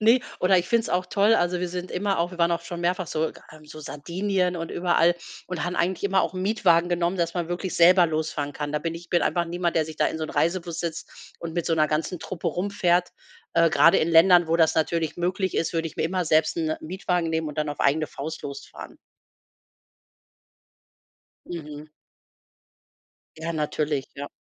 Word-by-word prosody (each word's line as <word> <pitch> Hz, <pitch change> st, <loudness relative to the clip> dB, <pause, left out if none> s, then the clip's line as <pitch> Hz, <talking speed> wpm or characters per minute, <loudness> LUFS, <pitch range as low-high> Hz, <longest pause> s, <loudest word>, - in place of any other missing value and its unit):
Ne 230 Hz, +4 st, +5 dB, 0.2 s
oder 185 Hz, 0 st, +4 dB
ich 175 Hz, -, -2 dB
find's 230 Hz, -1 st, +1 dB
auch 180 Hz, +1 st, 0 dB
toll, 210 Hz, +2 st, +3 dB
also 175 Hz, 0 st, +1 dB
wir 180 Hz, -, -2 dB
sind 180 Hz, +1 st, -6 dB
immer 195 Hz, 0 st, 0 dB
auch 175 Hz, +2 st, -1 dB
wir 175 Hz, -, -10 dB
waren 170 Hz, 0 st, +3 dB
auch 170 Hz, 0 st, -1 dB
schon 170 Hz, 0 st, -7 dB
mehrfach 180 Hz, +1 st, 0 dB
so 155 Hz, +1 st, -1 dB
äh -, -, -11 dB, 0.3 s
so 155 Hz, +1 st, -11 dB
Sardinien 180 Hz, +5 st, -2 dB
und 165 Hz, 0 st, -5 dB
überall 175 Hz, -1 st, +3 dB, 0.3 s
und 180 Hz, -, -4 dB
haben 180 Hz, +1 st, -3 dB
eigentlich 180 Hz, +2 st, 0 dB
immer 195 Hz, -1 st, +2 dB
auch 170 Hz, +2 st, -2 dB
'n 185 Hz, -, -3 dB
Mietwagen 175 Hz, -5 st, +3 dB
genommen, 175 Hz, +1 st, 0 dB
dass 170 Hz, 0 st, -1 dB
man 175 Hz, -2 st, -2 dB
wirklich 175 Hz, +1 st, -3 dB
selber 175 Hz, +1 st, +7 dB
losfahren 155 Hz, -2 st, -2 dB
kann. 145 Hz, 0 st, -5 dB
Da 150 Hz, -, +1 dB
bin 165 Hz, 0 st, -3 dB
ich 170 Hz, -, -10 dB
ich 170 Hz, -, -19 dB
bin 175 Hz, -, +2 dB
einfach 175 Hz, -1 st, +1 dB
niemand, 175 Hz, 0 st, -2 dB
der 160 Hz, -, +3 dB
sich 160 Hz, 0 st, -9 dB
da -, -, +2 dB
in 160 Hz, -, -3 dB
so 155 Hz, -, -2 dB
'n -, -, -6 dB
Reisebus 170 Hz, -1 st, -1 dB
setzt 170 Hz, -1 st, -4 dB, 0.3 s
und 165 Hz, -1 st, -6 dB
mit 175 Hz, -, -2 dB
so’ner 160 Hz, -2 st, +2 dB
ganzen 155 Hz, +3 st, -2 dB
Truppe 175 Hz, -2 st, -4 dB
herumfährt. 180 Hz, 0 st, +1 dB, 0.4 s
Äh, 165 Hz, 0 st, +5 dB
gerade 170 Hz, -, +5 dB
in 160 Hz, -, +1 dB
Ländern, 170 Hz, +1 st, +6 dB
wo 165 Hz, -, +3 dB
das 160 Hz, -2 st, +3 dB
natürlich 160 Hz, 0 st, 0 dB
möglich 185 Hz, +2 st, -1 dB
ist, 165 Hz, -, 0 dB
würde 165 Hz, 0 st, -1 dB
ich 160 Hz, -, -17 dB
mir -, -, 0 dB
immer 180 Hz, +1 st, -1 dB
selbst 155 Hz, +2 st, +2 dB
'n 160 Hz, -1 st, -1 dB
Mietwagen 175 Hz, 0 st, -2 dB
nehmen 160 Hz, -1 st, -1 dB
und 150 Hz, +1 st, -8 dB
dann 150 Hz, -1 st, 0 dB
auf 145 Hz, -, -5 dB
eigene 155 Hz, +2 st, +2 dB
Faust 155 Hz, +6 st, -6 dB
losfahren. 140 Hz, -1 st, -9 dB, 2.5 s
Mhm. 150 Hz, -3 st, -7 dB, 1.5 s
Ja, 165 Hz, +1 st, -3 dB
natürlich, 150 Hz, -2 st, -1 dB
ja. 140 Hz, 0 st, -6 dB
170 Hz, 205 wpm, -25 LUFS, 160-180 Hz, 2.5 s, selber